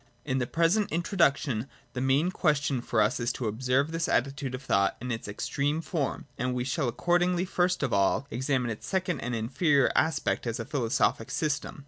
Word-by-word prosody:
In 130 Hz, -2 st, 0 dB
the 120 Hz, -, -1 dB
present 170 Hz, -, +2 dB
in 170 Hz, +2 st, 0 dB
troduction 140 Hz, -, +1 dB, 0.3 s
the 125 Hz, -, -3 dB
main 135 Hz, +7 st, +2 dB
question 150 Hz, -7 st, +1 dB
for 110 Hz, -3 st, +2 dB
us 105 Hz, -, 0 dB
is 120 Hz, 0 st, 0 dB
to 125 Hz, -, -4 dB
observe 130 Hz, +7 st, +1 dB
this 165 Hz, 0 st, -1 dB
attitude 135 Hz, 0 st, 0 dB
of 125 Hz, -, -9 dB
thought 100 Hz, -6 st, +2 dB
in 125 Hz, +1 st, -4 dB
its 115 Hz, -2 st, -4 dB
extreme 140 Hz, +8 st, -1 dB
form; 160 Hz, -4 st, -3 dB
and 125 Hz, +1 st, -1 dB
we 125 Hz, -, -1 dB
shall 135 Hz, +2 st, -1 dB
accordingly 175 Hz, +7 st, +1 dB
first 180 Hz, -2 st, 0 dB
of 130 Hz, -, 0 dB
all 100 Hz, +7 st, +2 dB
examine 125 Hz, -1 st, 0 dB
its 110 Hz, -, -7 dB
second 185 Hz, -5 st, -1 dB
and 120 Hz, +1 st, -3 dB
inferior 135 Hz, +5 st, +2 dB
aspect 160 Hz, -5 st, +1 dB
as 115 Hz, +1 st, -2 dB
a 115 Hz, -, -3 dB
philosophic 120 Hz, -5 st, 0 dB
system. 150 Hz, -2 st, -2 dB
135 Hz, 190 wpm, -28 LUFS, 120-160 Hz, 0.3 s, present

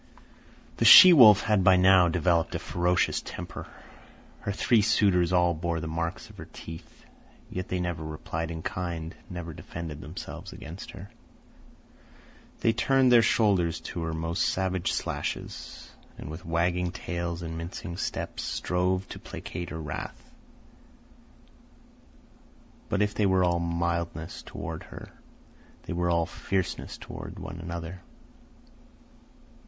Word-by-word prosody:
The -, -, +1 dB
she 185 Hz, -2 st, +11 dB
wolf 110 Hz, -, +9 dB
had 105 Hz, -4 st, +2 dB
by 95 Hz, +1 st, +6 dB
now 90 Hz, -1 st, +6 dB
developed 85 Hz, 0 st, +1 dB
a -, -, +1 dB
ferocious 90 Hz, 0 st, 0 dB
temper. -, -, -8 dB, 0.7 s
Her 100 Hz, -, -3 dB
three 110 Hz, +3 st, +3 dB
suitors 100 Hz, -5 st, +3 dB
all 90 Hz, -1 st, +3 dB
bore 85 Hz, +1 st, -2 dB
the 80 Hz, -, -5 dB
marks 85 Hz, +2 st, -4 dB
of -, -, -17 dB
her -, -, -9 dB
teeth. 80 Hz, 0 st, -11 dB, 0.5 s
Yet 90 Hz, 0 st, -4 dB
they 90 Hz, -, -2 dB
never 85 Hz, -3 st, -3 dB
replied 80 Hz, +1 st, -4 dB
in 80 Hz, -1 st, -6 dB
kind, 85 Hz, -2 st, -4 dB, 0.2 s
never 85 Hz, -3 st, -6 dB
defended 80 Hz, -1 st, -7 dB
themselves -, -, -8 dB
against 85 Hz, +4 st, -9 dB
her. 95 Hz, +2 st, -10 dB, 1.5 s
They 115 Hz, -, +3 dB
turned 130 Hz, +2 st, +3 dB
their 120 Hz, -1 st, +8 dB
shoulders 95 Hz, -8 st, +2 dB
to 85 Hz, -, -6 dB
her 80 Hz, 0 st, -3 dB
most 80 Hz, +3 st, -1 dB
savage 95 Hz, -1 st, -1 dB
slashes, -, -, -5 dB, 0.3 s
and 75 Hz, -, -7 dB
with 80 Hz, +2 st, -9 dB
wagging 90 Hz, +2 st, +1 dB
tails 85 Hz, -1 st, -4 dB
and 80 Hz, 0 st, -5 dB
mincing 85 Hz, +2 st, -6 dB
steps -, -, -4 dB
strove 90 Hz, +1 st, -1 dB
to -, -, -8 dB
placate 85 Hz, -1 st, -7 dB
her 80 Hz, -, -6 dB
wrath. 75 Hz, -2 st, -7 dB, 2.6 s
But 105 Hz, 0 st, +2 dB
if 105 Hz, 0 st, -1 dB
they 105 Hz, -, +2 dB
were 95 Hz, -1 st, +3 dB
all 85 Hz, -1 st, +2 dB
mildness 85 Hz, -1 st, -2 dB
toward -, -, -7 dB
her, -, -, -11 dB, 0.7 s
they -, -, -5 dB
were 85 Hz, 0 st, 0 dB
all 85 Hz, -1 st, +2 dB
fierceness 95 Hz, +2 st, -3 dB
toward 100 Hz, 0 st, -9 dB
one 95 Hz, -2 st, -7 dB
another. 85 Hz, +1 st, -6 dB
85 Hz, 135 wpm, -27 LUFS, 85-95 Hz, 2.6 s, she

